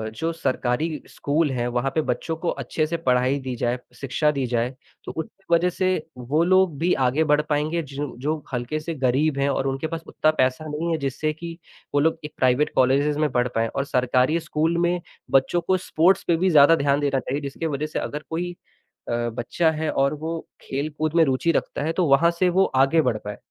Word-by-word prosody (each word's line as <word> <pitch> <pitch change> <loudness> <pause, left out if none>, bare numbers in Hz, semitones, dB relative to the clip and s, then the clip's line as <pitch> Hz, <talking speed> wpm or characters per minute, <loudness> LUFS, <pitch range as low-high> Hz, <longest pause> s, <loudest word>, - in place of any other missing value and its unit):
जो 165 +9 -1
सरकारी 150 0 -1
स्कूल 150 +1 0
हैं, 120 -2 -1
वहाँ 120 +2 0
पे 160 - +3
बच्चों 150 +4 -2
को 170 - +1
अच्छे 155 - -1
से 170 - -2
पढ़ाई 130 -2 +1
दी 130 -2 -5
जाए, 120 +1 -1 0.2
शिक्षा 135 +4 0
दी 140 -3 -2
जाए, 120 0 0 0.4
तो - - -5
उनके 190 +2 -5
वजह 170 +2 +4
से 185 +1 -1 0.3
वो 140 +7 +1
लोग 185 -3 +3
भी 175 +3 +2
आगे 145 +6 +2
बढ़ 150 - +5
पाएँगे 155 +3 0
जिन 145 0 -5
जो 155 +1 +1 0.2
हल्के 125 +5 -2
से 165 +2 -5
गरीब 140 +2 +1
हैं 140 +1 +2
और 135 0 0
उनके 135 +4 -2
पास 165 0 -5
उत्ता 155 - +2
पैसा 130 +4 +1
नहीं 155 +3 -2
है 165 - +1
जिससे 150 +2 -2
कि 165 +1 -8 0.4
वो 145 - +3
लोग 160 +2 +2
एक 150 - -8
प्राइवेट 130 +3 +2
कॉलेजेस 140 +3 +3
में 155 -1 +1
बढ़ 125 0 +1
पाएँ 115 0 +2
और 135 +4 -3
सरकारी 125 +4 +2
स्कूल 160 +1 0
में 175 0 0 0.3
बच्चों 135 +6 +3
को 185 +2 +1
स्पोर्ट्स 180 0 +2
पे 170 - +4
भी 185 +2 +2
ज़्यादा 155 0 +7
ध्यान 140 -1 +1
देना 140 -2 +1
चाहिए, 140 +3 -3
जिसके 140 +3 -4
वजह 145 0 -2
से 155 - -3
अगर 150 +1 -5
कोई 175 +2 -2 0.6
अ, 120 0 -1
बच्चा 120 +8 0
है 155 0 -2
और 140 +2 +1
वो 160 +2 -4 0.2
खेल-कूद 150 +3 -3
में 165 - +6
रुचि 135 +4 +1
रखता 145 - -2
है 160 +2 -1
तो 180 - +1
वहाँ 145 +5 +5
से 185 -1 +4
वो 190 +2 +3
आगे 135 +5 +4
बढ़ 125 -7 0
पाए। 105 0 -5
150 Hz, 215 wpm, -23 LUFS, 130-165 Hz, 0.6 s, ज़्यादा